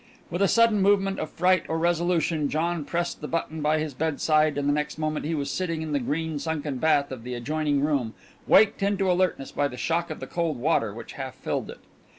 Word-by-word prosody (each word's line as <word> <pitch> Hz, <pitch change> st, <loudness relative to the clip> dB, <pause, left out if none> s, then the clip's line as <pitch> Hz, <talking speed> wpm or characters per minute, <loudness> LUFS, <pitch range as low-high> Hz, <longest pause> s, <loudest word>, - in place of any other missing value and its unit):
With 175 Hz, +3 st, -2 dB
a 200 Hz, -, +5 dB
sudden 230 Hz, -1 st, +4 dB
movement 195 Hz, 0 st, +2 dB
of -, -, -3 dB
fright 185 Hz, 0 st, +3 dB
or 160 Hz, -, 0 dB
resolution 170 Hz, -3 st, +1 dB
John 165 Hz, 0 st, -1 dB
pressed 175 Hz, +2 st, -2 dB
the 150 Hz, -, -4 dB
button 160 Hz, -1 st, -3 dB
by 150 Hz, +1 st, +2 dB
his 155 Hz, -2 st, -3 dB
bedside, 155 Hz, +1 st, +1 dB
and 145 Hz, 0 st, 0 dB
the 145 Hz, -, +3 dB
next 150 Hz, +1 st, -2 dB
moment 155 Hz, -1 st, -2 dB
he 165 Hz, -, -1 dB
was 140 Hz, -2 st, -2 dB
sitting 165 Hz, -4 st, -2 dB
in 155 Hz, -, -5 dB
the 145 Hz, -, +1 dB
green 155 Hz, +4 st, -2 dB
sunken 150 Hz, -3 st, -3 dB
bath 145 Hz, -2 st, +2 dB
of 130 Hz, -3 st, -6 dB
the 125 Hz, 0 st, -5 dB
adjoining 145 Hz, +3 st, 0 dB
room, 140 Hz, -6 st, 0 dB, 0.3 s
waked 205 Hz, 0 st, +5 dB
into 195 Hz, -1 st, +1 dB
alertness 180 Hz, -6 st, 0 dB
by 145 Hz, -, +1 dB
the 125 Hz, -3 st, -9 dB
shock 165 Hz, +7 st, -1 dB
of -, -, -6 dB
the -, -, -5 dB
cold 165 Hz, -5 st, -2 dB
water 120 Hz, -5 st, +1 dB
which 115 Hz, +3 st, -9 dB
half 130 Hz, -2 st, -6 dB
filled -, -, -3 dB
it. -, -, -10 dB
155 Hz, 220 wpm, -26 LUFS, 145-175 Hz, 0.3 s, a